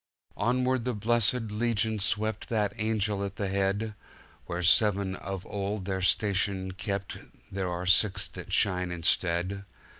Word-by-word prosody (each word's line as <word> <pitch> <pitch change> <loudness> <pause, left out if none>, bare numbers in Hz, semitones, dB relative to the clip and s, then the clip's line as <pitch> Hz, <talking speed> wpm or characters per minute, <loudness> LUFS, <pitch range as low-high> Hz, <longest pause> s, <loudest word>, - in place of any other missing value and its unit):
"Onward 125 +3 +1
the 125 -1 -2
blessed 115 +1 +1
legion 110 0 0
swept, 110 +2 0
That 105 -3 0
angel 105 -2 0
at 100 0 -4
the 100 -3 -2
head;(Where 100 -2 -4
seven 100 +1 +4
of 95 0 -6
old 100 -1 -3
their 95 -1 -2
station 95 -1 +1
kept 95 +1 -4 0.3
There 95 -1 -2
are 90 +1 -3
six 95 +1 +4
that - - -9
shine 90 -2 +2
instead.) 90 +2 0
100 Hz, 130 wpm, -28 LUFS, 95-110 Hz, 0.3 s, seven